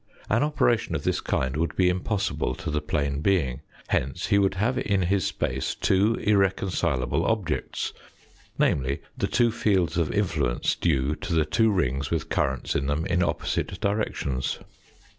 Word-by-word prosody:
An 115 - +3
operation 145 -7 +1
of - - -3
this - - 0
kind 65 +1 -1
would 80 +2 -1
be 90 - +3
impossible 95 +3 -1
to 90 -3 -5
the 75 0 0
plane 70 -1 -1
being. 80 -9 +1 0.3
Hence 65 0 -1
he 100 - +3
would 95 -1 +2
have 120 +6 +1
in 100 -5 +1
his 95 +1 +1
space 65 0 -2
two 100 +4 +2
irreconcilable 95 - +1
objects, 95 -9 -1 0.6
namely, 70 +2 +1
the - - -1
two 120 -1 +3
fields 95 -7 +1
of 80 - 0
influence - - 0
due 70 -4 +1
to 85 - -4
the 80 -1 +3
two 110 +9 +3
rings 70 -8 0
with 80 -3 -2
currents 65 -1 0
in 70 - -1
them 75 +4 0
in 90 -2 +1
opposite 90 +1 -1
directions. 100 - -1
90 Hz, 160 wpm, -26 LUFS, 70-100 Hz, 0.6 s, An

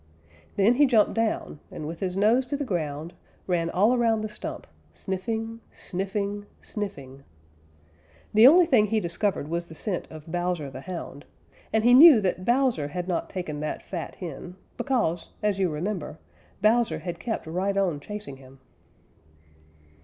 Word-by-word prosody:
Then 205 +4 +4
he 290 0 +6
jumped 225 -5 +3
down, 225 -9 -1
and 150 - -6
with 165 +1 -6
his 185 -1 -2
nose 230 +6 +3
to 285 - -2
the 285 - -3
ground, 160 - -3 0.3
ran 170 -2 0
all 205 +8 +3
around 230 -3 +2
the 215 - -3
stump, - - -6 0.3
sniffing, 220 - -4
sniffing, 200 +2 -4
sniffing. 140 -11 -7 1.1
The 220 +3 +8
only 345 +5 +7
thing 245 -10 +4
he 220 +1 +1
discovered 175 -2 -1
was 170 +2 -3
the 160 - -10
scent 185 +2 -3
of 155 0 -11
Bowser 175 -5 -2
the 130 - -8
Hound, 165 -4 -7 0.5
and 220 0 +2
he 245 +1 +6
knew 285 -1 +10
that 185 -2 -1
Bowser 240 - +2
had 175 +4 -5
not 175 -2 -2
taken 165 -6 -5
that 150 0 -4
fat 170 -4 -6
hen, 175 +1 -8 0.2
because, 215 - -1
as 205 -2 +1
you 185 -2 +2
remember, 165 +1 -4 0.5
Bowser 230 +2 +3
had 175 -2 -6
kept 225 - -3
right 185 +5 -1
on 180 -7 +1
chasing 205 -4 -7
him. 135 0 -16
190 Hz, 160 wpm, -26 LUFS, 165-220 Hz, 1.1 s, knew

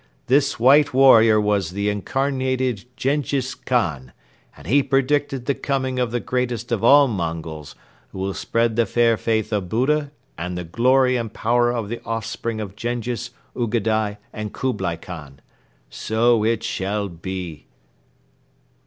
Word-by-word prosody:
This 140 0 +2
white 140 +3 +5
warrior 115 -5 +7
was 105 -4 +1
the 100 +3 -2
Incarnated 130 +1 -1
Jenghiz 135 -2 -1
Khan 80 - -2 0.4
and 70 - -14
he 140 - +4
predicted 135 -1 0
the 140 - +1
coming 130 -2 -2
of 125 -2 +1
the 120 +1 -1
greatest 120 -1 -2
of 115 -2 -1
all 140 +3 +7
Mongols 80 - -5 0.3
who - - -12
will 95 +1 -2
spread 115 +2 0
the 115 -2 +3
fair 115 +2 +3
faith 110 -1 -1
of 100 -4 -1
Buddha 145 +6 +1 0.3
and 90 +1 -4
the 90 - -4
glory 125 +8 +3
and 115 -3 -4
power 120 +2 +1
of 115 -4 -3
the 120 +3 -5
offspring 115 0 -4
of 100 -2 -6
Jenghiz, 120 +1 -3 0.3
Ugadai 110 -3 0 0.2
and 105 -1 -5
Kublai 95 -10 -2
Khan. 75 -6 -10 0.5
So 115 0 +1
it 115 0 0
shall 100 +2 -2
be!" 85 -2 -7
115 Hz, 145 wpm, -22 LUFS, 100-130 Hz, 0.5 s, warrior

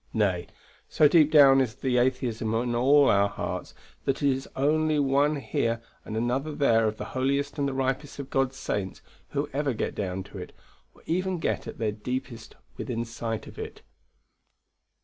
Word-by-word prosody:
Nay, 95 -5 +1 0.4
so 150 - +5
deep 155 -1 +5
down 140 -3 +7
is 120 -3 -1
the 130 -2 +1
atheism 120 -3 0
of 120 +1 0
all 135 +4 +5
our 100 0 +4
hearts, - - -5 0.3
that 135 +2 -1
it 140 - +4
is 135 +1 -4
only 155 +2 +2
one 145 +1 +2
here 115 -4 -1 0.2
and 110 - -5
another 130 +6 -1
there 115 -6 +3
of 110 0 -3
the - - -5
holiest 140 +3 0
and 140 - +1
the 135 - -2
ripest 135 +2 -2
of 140 -2 -7
God's 135 0 0
saints 95 -7 -3 0.3
who 145 +1 -2
ever 140 -1 0
get 115 - -2
down 95 -1 -3
to 100 0 -10
it, 90 - -8 0.4
or - - -21
even 185 +2 -1
get 165 - -2
at - - -7
their 110 -2 0
deepest 120 +1 -5 0.2
within 120 -2 -3
sight 115 -1 -4
of - - -11
it. - - -7
130 Hz, 180 wpm, -27 LUFS, 115-140 Hz, 0.4 s, down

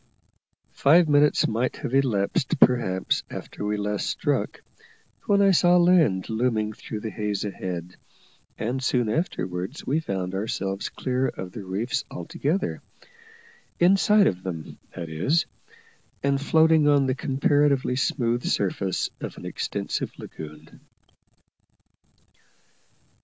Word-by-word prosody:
Five 165 +4 +5
minutes 145 0 +4
might 120 +3 -1
have 120 - -5
elapsed 125 -3 +1
perhaps 95 -7 +3
after - - -7
we 105 0 -1
last 105 0 -2
struck, - - -1 0.6
when 200 0 +4
I 195 - +5
saw 180 0 +5
land 170 - +4
looming 110 -2 0
through 105 0 -7
the 110 - -4
haze 105 -2 -2
ahead, 90 -3 -5 0.6
and 125 +4 -2
soon 125 -3 +1
afterwards 95 - -3
we 145 +4 +1
found 95 - -3
ourselves 95 -1 -3
clear 130 0 -1
of 90 -1 -6
the 105 - -8
reefs 100 +7 -2
altogether 155 - -2 1.0
inside 195 +3 +5
of 90 -1 0
them, 85 -4 -7 0.2
that 85 - -5
is 110 - +1 0.8
and 140 0 +1
floating 160 0 +4
on 145 -2 +4
the 130 - +1
comparatively 140 -1 +1
smooth 120 -2 0
surface 95 -1 -1
of - - -7
an - - -9
extensive - - -3
lagoon. 75 0 -10
120 Hz, 120 wpm, -25 LUFS, 95-145 Hz, 1.0 s, Five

